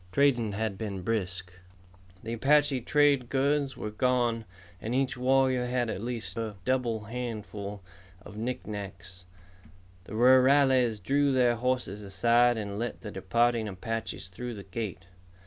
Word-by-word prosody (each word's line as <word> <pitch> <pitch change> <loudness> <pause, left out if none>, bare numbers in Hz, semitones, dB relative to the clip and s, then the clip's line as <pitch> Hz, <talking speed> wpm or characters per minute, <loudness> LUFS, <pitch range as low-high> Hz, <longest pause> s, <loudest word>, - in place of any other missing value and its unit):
Trading 120 -6 +2
had 110 -1 -2
been 100 -4 -4
brisk. 90 -4 -2 0.7
The 115 - -4
Apache 140 +2 +3
trade 140 -2 +3
goods 140 0 +1
were 105 - -4
gone 120 -1 +1 0.4
and 115 +3 -2
each 135 0 +1
warrior 130 0 +2
had 120 -2 0
at 95 - -5
least 120 -1 -4
a 110 -2 -4
double 120 -4 0
handful 105 -4 -6 0.4
of 100 - -11
knickknacks. 100 -6 -6 0.8
The - - -10
rurales 130 -1 +5
drew 140 +7 +2
their 125 -2 +3
horses 125 -4 -1
aside 115 +5 +3
and 100 -1 -4
let 120 +1 -4
the 105 - -7
departing 115 +4 +1
Apaches 110 0 -5
through 120 +5 -6
the 100 - -8
gate. 95 -2 -5
115 Hz, 135 wpm, -29 LUFS, 105-125 Hz, 0.8 s, rurales